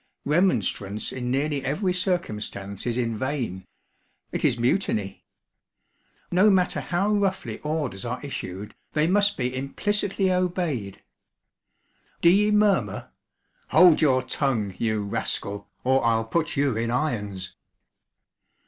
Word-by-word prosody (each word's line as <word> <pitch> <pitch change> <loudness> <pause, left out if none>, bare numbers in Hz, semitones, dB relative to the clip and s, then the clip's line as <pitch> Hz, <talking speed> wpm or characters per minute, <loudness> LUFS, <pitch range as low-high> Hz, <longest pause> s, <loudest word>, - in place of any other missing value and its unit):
Remonstrance 110 - 0
in 125 -1 -4
nearly 140 +2 0
every 180 +6 0
circumstance 105 - -3
is 120 0 -1
in 115 -3 -1
vain 120 -10 -3 0.6
it - - -2
is - - +3
mutiny. 120 - 0 1.1
No 185 +4 +5
matter 185 -3 +2
how 195 +4 0
roughly 195 -2 -1
orders 150 -10 -3
are 125 +1 -3
issued; 100 -7 -6 0.2
they 150 +1 +2
must 205 +3 +3
be 125 0 -2
implicitly 195 +8 0
obeyed. 175 - -2 1.2
'D'ye 195 +5 +5
murmur? 210 -2 +1 0.6
Hold 175 -4 +6
your 130 -4 +3
tongue, 125 -6 -1
you 110 -2 0
rascal, 100 0 -2
or 130 +1 +3
I'll 115 -1 +2
put 165 +6 -1
you 140 -4 +2
in 115 +1 -1
irons!' 105 -9 -2
135 Hz, 115 wpm, -25 LUFS, 110-180 Hz, 1.2 s, Hold